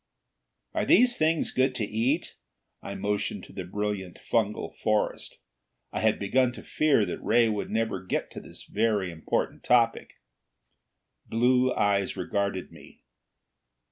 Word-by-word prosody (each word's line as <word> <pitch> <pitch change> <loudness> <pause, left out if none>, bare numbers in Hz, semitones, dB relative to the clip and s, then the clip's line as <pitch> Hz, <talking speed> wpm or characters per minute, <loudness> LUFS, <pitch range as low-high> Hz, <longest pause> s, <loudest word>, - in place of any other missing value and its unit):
"Are - - 0
these 245 0 +5
things 160 +1 +1
goods 130 0 +1
to 110 - -1
eat?" 120 +10 -1 0.5
I 100 - -6
motioned 105 +1 -2
to - - -13
the 95 - -5
brilliant 100 -1 -3
fungal 105 -3 -1
forest. 110 -1 0 0.5
I - - -3
had 110 0 +2
begun 125 +5 +2
to - - -10
fear 145 -8 +2
that - - -5
Ray 120 -1 +4
would 105 -1 -2
never 110 -4 -1
get 90 - -2
to - - -8
this - - -11
very 105 -4 0
important 80 -1 -2
topic. 120 -2 +2 1.1
Blue 125 +2 +3
eyes 100 -2 +1
regarded 100 -2 -2
me. - - -16
110 Hz, 140 wpm, -27 LUFS, 100-125 Hz, 1.1 s, these